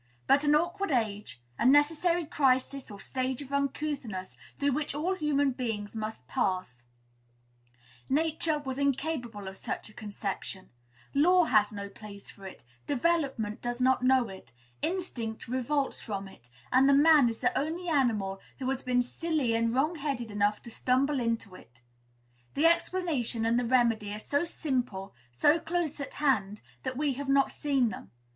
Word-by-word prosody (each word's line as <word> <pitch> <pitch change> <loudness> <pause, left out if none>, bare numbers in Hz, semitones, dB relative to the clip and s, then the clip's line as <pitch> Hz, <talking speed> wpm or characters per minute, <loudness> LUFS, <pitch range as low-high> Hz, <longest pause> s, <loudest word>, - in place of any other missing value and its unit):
But 280 - +4
an 295 0 +5
awkward 345 +5 0
age, 210 - -1 0.2
a - - +1
necessary 320 +5 +4
crisis 270 -2 +1
or 205 -1 -9
stage 255 +1 -3
of 275 0 -11
uncouthness, 275 - -2 0.2
through 285 0 +1
which 290 +1 -2
all 335 +6 0
human 290 -5 +1
beings 225 -5 -4
must 215 -12 -5
pass, 160 -9 -2 1.2
Nature 315 +2 +1
was 270 -2 -5
incapable 270 -7 -1
of 190 0 -7
such - - -5
a - - -17
conception; 200 -3 -6 0.4
law 355 +6 +5
has 210 -9 +3
no 200 -1 -5
place 200 0 -11
for 195 -1 -11
it; 185 - -12 0.2
development 275 -7 0
does 240 0 -3
not 255 0 +3
know 255 -1 +4
it; 190 -11 -12 0.3
instinct 250 -13 -3
revolts 260 +3 -1
from 200 -2 -4
it; 120 -11 -16 0.2
and 260 +2 +5 0.2
man 305 -6 +7
is 225 - -6
the - - +1
only 330 +5 -2
animal 220 - +1 0.2
who 260 - -4
has 265 - -2
been 250 -1 +2
silly 295 -2 -1
and 230 +1 +1
wrong 300 +6 +2
headed 275 -6 -3
enough 205 0 +1
to 235 - -10
stumble 265 +4 +1
into 230 -4 -2
it. 120 -8 -16 0.7
The 295 - +2
explanation 330 -9 +1
and 230 +1 +3
the 245 - -1
remedy 230 -4 +2
are - - -5
so 285 +9 0
simple, 250 - -3 0.2
so 295 - +5
close 330 -2 -2
at 280 - -5
hand, 215 -9 0 0.2
that 255 -1 -4
we 290 -1 +1
have 275 +2 -5
not 275 0 +4
seen 275 -5 +1
them. 140 - -8
255 Hz, 160 wpm, -29 LUFS, 215-295 Hz, 1.2 s, man